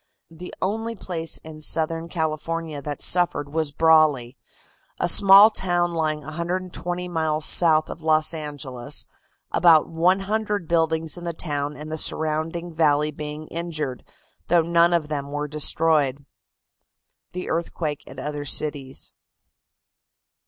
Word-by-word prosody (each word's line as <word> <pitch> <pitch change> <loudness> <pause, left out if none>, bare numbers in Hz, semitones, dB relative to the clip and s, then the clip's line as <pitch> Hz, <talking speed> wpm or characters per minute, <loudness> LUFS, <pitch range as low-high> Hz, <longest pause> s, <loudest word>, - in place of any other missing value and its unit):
The 175 +2 -10
only 225 +4 -2
place 165 -5 -4
in 155 -1 -11
Southern 165 +1 -1
California 160 -1 -3
that 145 +1 -5
suffered 170 -5 +2
was 160 -2 0
Brawley, 150 -6 +3 0.6
a - - +1
small 200 +3 +8
town 175 -3 0
lying 155 -2 -1
120 175 +3 -4
miles 160 -3 -1
south 155 -3 +5
of 165 - -9
Los 155 0 +2
Angeles, 145 -3 -4 0.5
about 165 -3 +5
100 195 +3 0
buildings 160 0 0
in - - -11
the 170 -1 -3
town 145 -3 -2
and 155 +1 -8
the 160 - -2
surrounding 160 +3 -1
valley 150 -1 +2
being 150 0 -7
injured, 155 -6 -4 0.4
though 170 -1 +3
none 170 +1 +3
of 170 -3 0
them 140 -2 -4
were 145 0 -3
destroyed. 150 -2 +1 1.1
THE 180 0 -5
EARTHQUAKE 160 -2 -3
AT - - -12
OTHER 150 0 -4
CITIES. 140 -2 -3
160 Hz, 125 wpm, -23 LUFS, 150-170 Hz, 1.1 s, small